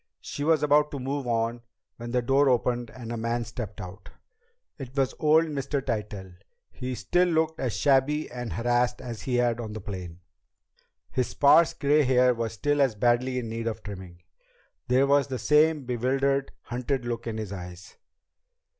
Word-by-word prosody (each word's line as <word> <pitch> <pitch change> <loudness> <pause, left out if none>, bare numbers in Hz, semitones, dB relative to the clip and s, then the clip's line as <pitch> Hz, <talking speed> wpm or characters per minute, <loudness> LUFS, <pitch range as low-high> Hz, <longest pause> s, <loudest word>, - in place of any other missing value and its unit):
She 145 - -6
was 155 0 +3
about 150 0 +4
to 140 - -5
move 135 +1 -3
on 115 0 -1 0.4
when 120 0 -7
the 125 0 0
door 135 +3 +3
opened 120 -1 0
and 120 -3 -9
a 120 - -3
man 115 +1 -1
stepped 110 -4 -7
out. 90 +1 -9 0.7
It 135 0 -9
was 135 -2 +1
old 155 +1 +4
Mr. 140 -2 -2
Tytell! 105 -7 -4 0.4
He 125 0 -5
still 175 +10 +2
looked 160 -1 0
as 120 -5 -2
shabby 140 +6 +2
and 120 -2 -5
harassed 120 +1 +1
as 115 -4 -7
he 125 - -2
had 120 -1 +1
on 110 -3 -5
the 110 - -5
plane. 90 -4 -7 0.9
His 125 -2 0
sparse 150 +4 +4
gray 145 +2 +3
hair 125 -2 +4
was 115 -2 -3
still 145 +6 0
as 130 -5 +2
badly 120 +3 +1
in 120 -2 -3
need 115 +1 -4
of 115 - -4
trimming. 95 -4 -9 0.6
There 130 +2 +4
was 140 0 +3
the 130 -2 -3
same 150 +1 +3
bewildered, 135 +3 0
hunted 125 +1 -3
look 120 -1 -4
in 110 -1 -3
his 105 -3 -5
eyes. 90 -1 -9
125 Hz, 175 wpm, -27 LUFS, 115-140 Hz, 0.9 s, about